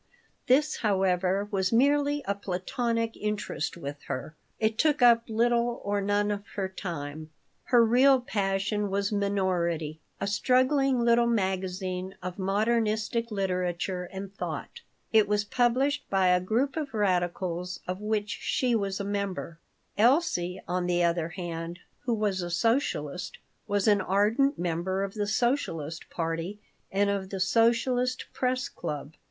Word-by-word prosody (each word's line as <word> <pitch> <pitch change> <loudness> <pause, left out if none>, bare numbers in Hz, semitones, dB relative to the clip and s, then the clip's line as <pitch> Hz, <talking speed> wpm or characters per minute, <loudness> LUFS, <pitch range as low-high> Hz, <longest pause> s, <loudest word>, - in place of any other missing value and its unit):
This, 295 +4 +3
however, 190 -1 +1
was 190 -2 +1
merely 285 +4 +3
a 200 - +2
platonic 225 +4 -2
interest 210 -6 -3
with 145 -3 -6
her. 150 +4 -5 0.2
It 220 0 0
took 300 -4 +3
up 235 -1 +6
little 235 +1 +1
or 205 0 0
none 205 +1 +1
of 205 -1 -3
her 195 -2 -1
time. 155 -5 -6 0.4
Her 240 -2 +5
real 260 +4 +5
passion 205 -2 -1
was 200 +1 0
Minority, 180 -6 0 0.2
a - - -1
struggling 255 +5 +2
little 235 0 +4
magazine 190 -3 -1
of 180 +1 -5
"modernistic 220 +3 0
literature 180 -2 -1
and 190 +2 -8
thought." 475 - -5 0.3
It 215 -2 +5
was 210 0 +1
published 255 +6 +1
by 190 -2 +3
a 180 0 +4
group 240 +9 0
of 300 -7 -4
radicals 180 -2 -1
of 185 +2 -3
which 210 -1 -1
she 250 -2 +1
was 200 -3 0
a - - -2
member. 200 -4 -3 0.4
Elsie, 215 - +3
on 180 0 -1
the 175 0 +2
other 170 -1 +1
hand, 170 -1 -5 0.3
who 240 -2 +1
was 205 -3 0
a 175 - -4
socialist, 180 - 0 0.3
was 205 -1 +1
an 205 -2 +5
ardent 215 +10 +2
member 180 +3 -1
of 195 0 -4
the 210 -2 -2
Socialist 205 - -1
party 165 +4 -3 0.3
and 200 +1 +2
of 195 -2 -3
the 195 - -4
Socialist 240 +5 +2
Press 255 +1 0
Club. 150 0 -6
200 Hz, 140 wpm, -28 LUFS, 180-235 Hz, 0.4 s, up